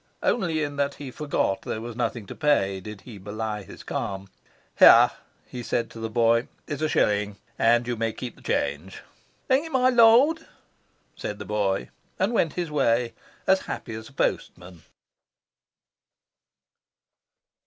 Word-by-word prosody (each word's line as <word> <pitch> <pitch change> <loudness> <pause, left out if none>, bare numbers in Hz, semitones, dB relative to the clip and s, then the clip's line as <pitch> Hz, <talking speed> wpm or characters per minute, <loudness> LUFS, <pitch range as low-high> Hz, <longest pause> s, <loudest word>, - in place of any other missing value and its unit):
Only 165 -9 +1
in 145 -1 -4
that 140 0 0
he 135 -2 -8
forgot 145 -9 -1
there 110 - -4
was 115 0 -7
nothing 115 -2 -2
to - - -8
pay 100 -11 +1
did 105 +1 -9
he 110 -5 -11
belie 105 +2 -4
his - - -12
calm. 95 0 -4 0.5
"Here," - - +9 0.3
he 125 - -7
said 120 0 -2
to 115 - -10
the 115 0 -4
boy, 115 +1 +2 0.2
"is 145 -1 -5
a 155 - +1
shilling; 105 -4 +1 0.2
and 120 +1 +4
you 120 0 -2
may 115 0 -1
keep 125 +2 -7
the - - -19
change." 75 +7 -2 0.4
"Thank 265 +4 +3
you, - - -7
my 255 -2 +3
Lord," 250 +7 +5 0.7
said 105 - -5
the - - -8
boy, 100 -10 -1 0.3
and 195 +5 0
went 165 -8 +1
his 175 -3 -3
way, 120 -4 +1 0.3
as 190 0 +4
happy 115 - -5
as 110 +2 -8
a - - -20
postman. 90 -9 -3
120 Hz, 155 wpm, -25 LUFS, 105-150 Hz, 0.7 s, Here